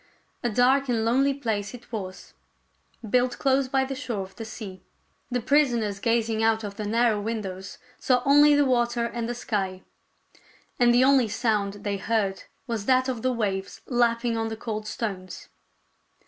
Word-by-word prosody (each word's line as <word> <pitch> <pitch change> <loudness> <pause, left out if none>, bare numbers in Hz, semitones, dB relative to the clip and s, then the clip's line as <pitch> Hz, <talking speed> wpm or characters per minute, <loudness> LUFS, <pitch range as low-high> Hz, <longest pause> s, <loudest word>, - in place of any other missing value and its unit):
A 240 - 0
dark 255 +4 +3
and 225 -2 +1
lonely 265 +4 +3
place 220 -5 -3
it 240 0 -15
was, 190 -5 -7 0.7
built 250 +3 +1
close 270 0 +2
by 265 0 +1
the 270 - -4
shore 240 -7 -4
of 190 0 -13
the 225 - -7
sea. 200 -4 -8 0.5
The 245 -1 -1
prisoners 240 -6 +2
gazing 230 0 +1
out 225 0 +2
of 200 -1 -6
the 210 0 -4
narrow 225 -1 +2
windows 200 -3 -5 0.2
saw 250 -1 +2
only 290 +1 +6
the 290 0 +4
water 240 -2 +1
and 235 0 -3
the 240 - -3
sky; 190 -5 -3 1.0
and 240 -1 +5
the 245 +1 +5
only 265 -3 +5
sound 205 -2 -1
they 200 -1 -1
heard 200 -1 -1 0.2
was 230 -5 -4
that 255 0 +3
of 245 -3 -3
the 255 - +1
waves 195 -5 -3
lapping 235 -1 +1
on 225 0 -1
the 220 0 -5
cold 215 -2 -5
stones. 195 -5 -5
230 Hz, 170 wpm, -26 LUFS, 210-250 Hz, 1.0 s, only